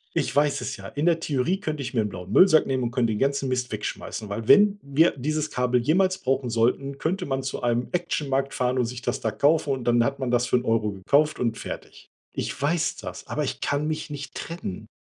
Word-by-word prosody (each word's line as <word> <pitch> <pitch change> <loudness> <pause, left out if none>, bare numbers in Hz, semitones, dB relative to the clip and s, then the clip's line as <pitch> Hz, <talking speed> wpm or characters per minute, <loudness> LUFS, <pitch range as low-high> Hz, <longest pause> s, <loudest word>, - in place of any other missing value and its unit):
ich - - 0
weiß 145 0 +2
es - - -4
ja“. - - -9
In 145 +3 -3
der 170 -1 +3
Theorie 160 +4 0
könnte 155 -7 -3
ich 125 - -5
mir 115 - +2
'n 105 - -2
blauen 90 0 -8
Müllsack 160 - +6
nehmen 130 -1 -1
und 120 - -1
könnte 120 -3 +1
den 105 - -3
ganzen 140 0 +1
Mist 125 -1 -1
wegschmeißen. 105 0 -5
Weil 110 +2 -4
wenn 205 0 +6
wir 140 +4 +3
dieses 155 +3 -2
Kabel 125 -1 +1
jemals 185 +7 +2
brauchen 130 -1 -1
sollten, 125 +4 0
könnte 180 +6 -1
man 135 -1 -2
zu 130 - -4
einem 120 0 0
Actionmarkt 140 -6 -1
fahren 125 0 0
und 125 - +2
sich 120 +1 -6
das - - -1
da 110 - 0
kaufen 145 +7 +2
und 130 - -4
dann 120 0 +3
hat 140 +3 -1
man 130 -2 -2
das 120 0 +2
für - - +2
'n 125 - -3
Euro 115 -2 +1
gekauft 145 +11 +2
und 115 -2 0
fertig. - - -8 0.2
Ich - - -4
weiß 155 +3 0
das, - - -8
aber - - -2
ich - - -4
kann 145 +2 0
mich 155 0 -3
nicht 145 -1 -7
trennen. 165 - -6
135 Hz, 235 wpm, -25 LUFS, 120-155 Hz, 0.2 s, Müllsack